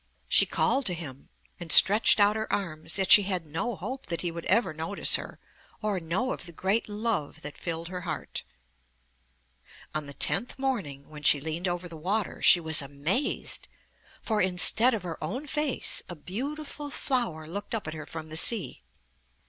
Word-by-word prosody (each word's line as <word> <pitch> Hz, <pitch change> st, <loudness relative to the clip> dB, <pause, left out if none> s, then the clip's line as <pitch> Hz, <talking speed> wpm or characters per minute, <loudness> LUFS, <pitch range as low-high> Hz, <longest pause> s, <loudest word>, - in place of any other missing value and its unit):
She -, -, +4 dB
called 270 Hz, -2 st, 0 dB
to 180 Hz, -, +1 dB
him 140 Hz, -5 st, -10 dB, 0.3 s
and 170 Hz, -2 st, -6 dB
stretched 210 Hz, +2 st, +6 dB
out 205 Hz, +1 st, +4 dB
her 220 Hz, 0 st, -4 dB
arms, 160 Hz, -4 st, -1 dB
yet 190 Hz, -1 st, 0 dB
she 210 Hz, -, +10 dB
had 185 Hz, -4 st, -2 dB
no 165 Hz, +10 st, -4 dB
hope 265 Hz, +1 st, -7 dB
that 170 Hz, -, -3 dB
he 175 Hz, -, -2 dB
would 170 Hz, 0 st, -8 dB
ever 215 Hz, -3 st, +2 dB
notice 160 Hz, +6 st, -1 dB
her -, -, -6 dB, 0.4 s
or 210 Hz, -3 st, -2 dB
know 180 Hz, +10 st, -2 dB
of -, -, -6 dB
the -, -, -8 dB
great 195 Hz, +7 st, -1 dB
love 205 Hz, -8 st, -3 dB
that 150 Hz, 0 st, -8 dB
filled 165 Hz, -1 st, -5 dB
her 180 Hz, -1 st, -6 dB
heart. 170 Hz, -2 st, -6 dB, 1.5 s
On 155 Hz, -2 st, -4 dB
the 140 Hz, -, -9 dB
tenth 245 Hz, -, +1 dB
morning, 205 Hz, -, -3 dB
when 150 Hz, -1 st, -11 dB
she 145 Hz, -, +5 dB
leaned 160 Hz, +5 st, -4 dB
over 175 Hz, 0 st, -4 dB
the 170 Hz, -, -11 dB
water, 195 Hz, +6 st, -2 dB
she 175 Hz, -, +7 dB
was 160 Hz, -1 st, +2 dB
amazed, 145 Hz, -, -2 dB, 0.6 s
for 215 Hz, -2 st, 0 dB
instead 190 Hz, +7 st, +6 dB
of 205 Hz, -, -6 dB
her 165 Hz, -3 st, -7 dB
own 255 Hz, -, -5 dB
face, 295 Hz, -2 st, 0 dB
a 175 Hz, -, -7 dB
beautiful 285 Hz, -, -6 dB
flower 235 Hz, -, -2 dB
looked 205 Hz, +6 st, -5 dB
up 215 Hz, -, -5 dB
at 155 Hz, -, -5 dB
her 155 Hz, -1 st, -9 dB
from 160 Hz, -1 st, -9 dB
the 155 Hz, -, -3 dB
sea. 200 Hz, -, +4 dB
180 Hz, 180 wpm, -27 LUFS, 160-220 Hz, 1.5 s, she